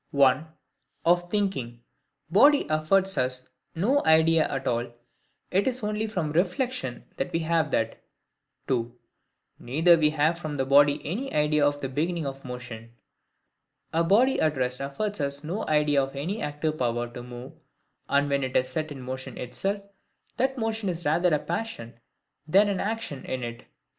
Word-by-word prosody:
(1) 140 +2 +3 0.6
Of 175 +1 +3
thinking, 155 - -2 0.4
body 280 - +5
affords 190 +4 +2
us 130 0 -1 0.3
no 245 +12 +2
idea 160 0 +4
at 135 -1 -3
all; 120 0 -1 0.6
it 195 +5 +2
is 255 -2 -2
only 210 +1 -1
from 180 -8 -2
reflection 180 - -1
that - - -2
we 165 - 0
have 160 -1 +1
that. 115 -4 -1 0.7
(2) 120 -1 -1 0.6
Neither 155 +8 +2
have 165 -1 +7
we 155 +2 +2
from 150 -3 -4
body 140 +2 +4
any 235 - -3
idea 150 0 +2
of 145 0 +1
the 135 - -2
beginning 160 +4 -1
of 135 0 -6
motion. 120 -2 -8 1.0
A 165 +1 +3
body 225 +10 +3
at 155 -2 +1
rest 125 0 -1
affords 165 +10 -3
us 140 +1 -2
no 175 +8 -3
idea 150 -2 +3
of 135 +1 -4
any 180 +11 -3
active 150 +1 -2
power 120 -1 0
to 120 - -7
move; 125 +1 -9 0.6
and 140 +1 +3
when 140 -1 0
it 130 0 0
is 130 0 +1
set 155 +3 -3
in 135 -3 -7
motion 130 +1 -6
itself, 195 - -3 0.5
that 265 +2 0
motion 225 -3 -1
is 170 -1 -5
rather 170 +4 +3
a 150 - +4
passion 155 - -5 0.5
than 200 +6 +5
an 195 -2 -1
action 215 -11 -3
in 130 -1 -4
it. 120 +1 -7
150 Hz, 165 wpm, -26 LUFS, 130-185 Hz, 1.0 s, have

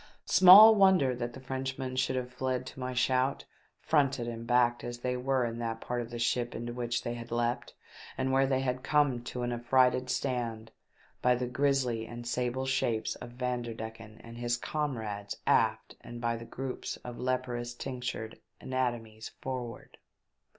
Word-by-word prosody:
Small 200 +4 +10
wonder 190 -10 +4
that 120 0 -4
the 130 - -9
Frenchmen 130 0 -4
should 130 0 0
have 125 -1 -3
fled 130 -1 -2
to 130 - -10
my 130 0 -3
shout, 130 +2 +1 0.3
fronted 135 -6 +1
and 115 0 -6
backed 120 0 +3
as 120 0 -6
they 125 0 -1
were 130 0 +1
in 115 0 -4
that 115 -1 -3
part 120 +1 -3
of 115 - -7
the 120 - -6
ship 120 +1 0
into 120 +1 -5
which 120 -1 -2
they 120 - -3
had 120 0 -8
leapt, 120 +1 -1 0.4
and 130 0 0
where 135 0 +3
they 130 -1 +1
had 130 -1 -1
come 140 -4 +2
to 125 0 -4
an 120 - -1
affrighted 125 +1 +2
stand, 115 -4 -2 0.5
by 125 0 +4
the 125 +1 -2
grisly 125 -3 0
and 120 0 -8
sable 125 +2 -1
shapes 120 -4 0
of 120 -1 -10
Vanderdecken 115 -3 -5
and 115 0 -10
his 120 0 0
comrades 110 -9 -3
aft, - - +2
and 120 - -8
by 120 -1 0
the 115 0 -8
groups 130 +2 -5
of 120 -1 -8
leprous 125 -1 -2
tinctured 125 -3 -5 0.2
anatomies 120 -4 -3
forward. 125 -3 -6
125 Hz, 170 wpm, -30 LUFS, 120-130 Hz, 0.5 s, Small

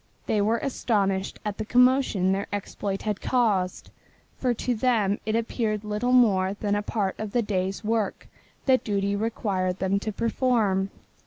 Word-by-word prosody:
They 210 - +1
were 220 +3 +2
astonished 200 -7 -1
at 210 0 -3
the - - -1
commotion 250 -5 +3
their 195 +1 -1
exploit 200 -1 -4
had 210 -2 -2
caused, 205 -7 0 0.4
for 255 - 0
to 245 +1 -1
them 215 -4 +1
it 215 - +1
appeared 225 -2 -1
little 210 +4 -1
more 200 -6 +4
than 205 0 -1
a 205 - +1
part 205 -2 -1
of 215 -2 -5
the 240 - +2
day's 195 0 -2
work 215 -2 -1 0.4
that 260 -1 +4
duty 200 -1 0
required 200 -4 -1
them 195 +1 0
to 215 - -3
perform. 220 -3 +1
210 Hz, 160 wpm, -26 LUFS, 195-230 Hz, 0.4 s, more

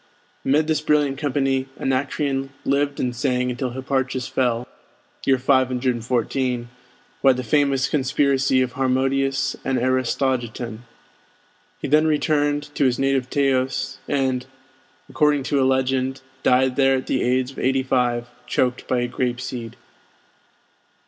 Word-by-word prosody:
Amid 145 +3 +2
this 155 -1 0
brilliant 145 -3 +1
company 135 -2 0
Anacreon 135 +1 -1 0.2
lived 140 +1 0
and 125 -1 -1
sang 125 -1 0
until 125 +1 -3
Hipparchus 130 0 -2
fell 125 -1 0 0.6
(514) 125 -1 +1 0.5
by 135 -1 +6
the 130 0 -4
famous 140 +1 +2
conspiracy 135 -2 +2
of 130 - -3
Harmodius 135 0 0
and 130 -1 0
Aristogeiton. 125 -2 -1 1.0
He - - -4
then 155 +3 +4
returned 145 -1 0
to 140 - +1
his 125 -2 +2
native 135 -2 0
Teos, 135 -1 0
and 130 -2 0 0.6
according 150 -2 +2
to 140 +2 +1
a - - +3
legend, 130 0 0 0.2
died 130 +1 +3
there 135 -1 +4
at 130 - -5
the 130 - 0
age 130 +1 +1
of - - -10
eighty 130 0 +1
five, 125 -2 +1 0.2
choked 125 -1 0
by 125 -1 +1
a 120 - 0
grape 120 0 -2
seed. 120 -3 -6
130 Hz, 130 wpm, -22 LUFS, 125-135 Hz, 1.0 s, by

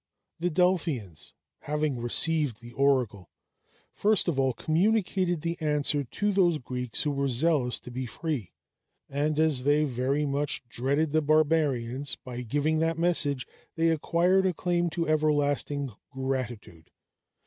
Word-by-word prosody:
The 175 +2 0
Delphians, 160 - -1 0.3
having 150 -3 -2
received 140 +1 +1
the 120 0 -12
oracle, 120 - +1 0.6
first 210 -1 +2
of 155 -6 0
all 135 -1 +3
communicated 180 - +1
the 170 +1 -3
answer 150 -1 +1
to 205 - -1
those 180 -5 +3
Greeks 125 -3 -3
who 150 - 0
were 140 0 0
zealous 135 -1 +1
to 125 - -10
be 130 +1 -4
free; 140 - -4 0.6
and 150 +2 -1
as 155 -5 +2
they 145 +3 +3
very 135 +2 0
much 140 -2 -1
dreaded 140 +6 0
the 155 +1 +2
barbarians, 145 -4 +1
by 125 -1 -5
giving 145 +6 0
that 165 0 0
message 155 -6 +1 0.3
they 165 0 +2
acquired 175 +4 +2
a 180 - -1
claim 175 0 0
to 165 +1 -2
everlasting 145 -3 +1 0.2
gratitude. 130 - -5
145 Hz, 135 wpm, -28 LUFS, 130-165 Hz, 0.6 s, all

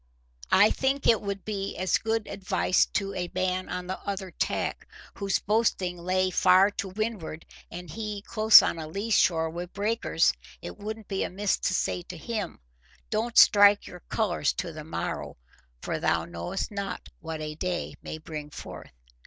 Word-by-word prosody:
I 205 +2 +6
think 270 +1 0
it 225 -3 +5
would 200 -1 -4
be 200 -2 -3
as 185 +1 +1
good 225 -1 -1
advice 185 -1 +1
to 195 -1 -2
a 180 -2 -3
man 185 0 -1
on 180 0 -4
the 185 +1 -4
other 195 -2 -5
tack, - - -2 0.3
whose 200 -1 +1
boasting 195 -4 0
lay 185 +1 +1
far 185 +2 +5
to 200 -1 -4
windward, 195 -6 -4 0.2
and 175 +1 -8
he 210 +4 -5
close 215 0 +7
on 165 - -1
a 155 - -5
lee 200 +8 -4
shore 165 -5 +3
wi' 175 +2 -5
breakers—it 80 - -1
wouldn't 215 +1 -6
be 195 -1 -1
amiss 200 +2 -1
to 185 - 0
say 180 - -1
to 175 0 -9
him, 215 +4 -4 0.5
'Don't 225 +2 -1
strike 205 0 +7
your 180 - -10
colours 180 -9 0
to 170 - -4
the 155 0 -7
morrow; 160 - -4 0.5
for - - -2
thou 80 0 +1
knowest 85 - -4
not 200 -3 -5
what 160 -1 -6
a 155 0 -4
day 175 +3 -3
may - - -6
bring 155 -1 -7
forth. - - -9
185 Hz, 170 wpm, -27 LUFS, 170-210 Hz, 0.5 s, close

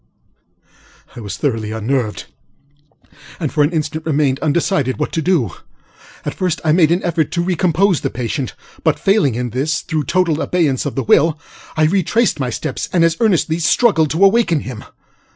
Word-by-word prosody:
ŌĆØ - - -17
I - - -6
was 100 -4 -6
thoroughly 115 -6 -2
unnerved, 110 0 -2 1.1
and 155 -6 -3
for 150 - +2
an 145 - +4
instant 155 -1 -3
remained 145 -3 +1
undecided 150 - 0
what - - -2
to 165 - -1
do. 155 - +1 0.7
At - - -2
first 180 -3 -1
I 155 - +3
made 160 -1 +4
an 175 +3 +1
endeavor 170 -2 +1
to 170 +4 -3
recompose 180 0 +1
the - - -1
patient; 125 +2 -4 0.3
but, - - +2
failing 195 - +2
in 125 0 -3
this 140 +7 -1
through 155 -3 -2
total 170 -4 +1
abeyance 150 -7 0
of 145 - -5
the 135 - -1
will, 155 +6 +3 0.4
I 155 - +3
retraced 195 +4 +1
my 130 -2 -1
steps 120 - -4
and 175 -2 +3
as 165 -1 +3
earnestly 175 -7 +1
struggled 160 - +3
to 170 +7 +3
awaken 195 -7 +3
him. 125 -4 -8
155 Hz, 175 wpm, -17 LUFS, 135-175 Hz, 1.1 s, an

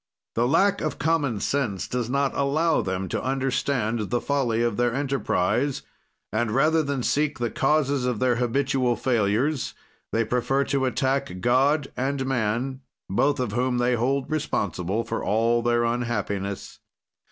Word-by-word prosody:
"The 120 +1 +1
lack 195 +9 +3
of 155 - -2
common 145 -9 +1
sense 120 -9 -1
does 125 -2 -2
not 140 +1 +1
allow 155 +4 +2
them 95 0 -3
to - - -2
understand 130 -4 -1
the 120 - +1
folly 120 -5 0
of 120 -3 0
their 120 +1 +1
enterprise, 135 -2 0 0.5
and 110 +1 +1
rather 155 +8 +3
than 140 -4 -2
seek 150 +2 +1
the 120 -2 -2
causes 140 -2 +1
of 125 -3 0
their 125 0 +2
habitual 125 0 +1
failures, 120 +4 0 0.4
they 115 0 +1
prefer 125 +4 +1
to 135 -1 0
attack 135 -5 -1
God 135 +6 +2
and 135 +1 -1
man, 130 +1 -1 0.3
both 140 +8 +2
of 125 -5 -1
whom 125 +2 0
they 120 +1 +2
hold 130 +4 0
responsible 100 - -1
for 115 - -4
all 115 +2 +2
their 120 0 +2
unhappiness. 105 -5 -2
125 Hz, 150 wpm, -25 LUFS, 115-140 Hz, 0.5 s, lack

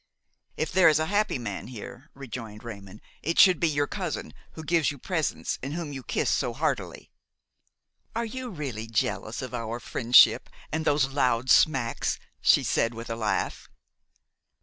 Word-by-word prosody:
"If 155 - -2
there 185 -3 +6
is 155 - +3
a 155 - 0
happy 205 -1 +1
man 110 -5 -5
here," 125 +4 -10
rejoined 115 -5 -8
Raymon, 100 -3 -9 0.2
"it 165 +2 -2
should 185 -4 +7
be 170 - +2
your 145 -1 +1
cousin, 180 -1 -5 0.2
who 160 - -8
gives 165 0 +2
you 145 - -6
presents 160 +3 -2
and 140 +4 -4
whom 165 -4 -5
you 135 - -6
kiss - - -2
so - - 0
heartily." - - -3 1.0
"Are 230 +1 -1
you 255 +3 -6
really 135 - -5
jealous 110 +2 -2
of 130 - -7
our 115 0 -4
friendship 120 0 +5 0.2
and 160 - -1
of - - -6
those 145 -3 +2
loud 125 -2 +1
smacks?" 130 -7 +3 0.2
she - - +5
said 115 0 0
with 115 0 -7
a - - -2
laugh. 105 -4 -2
135 Hz, 170 wpm, -27 LUFS, 115-160 Hz, 1.0 s, should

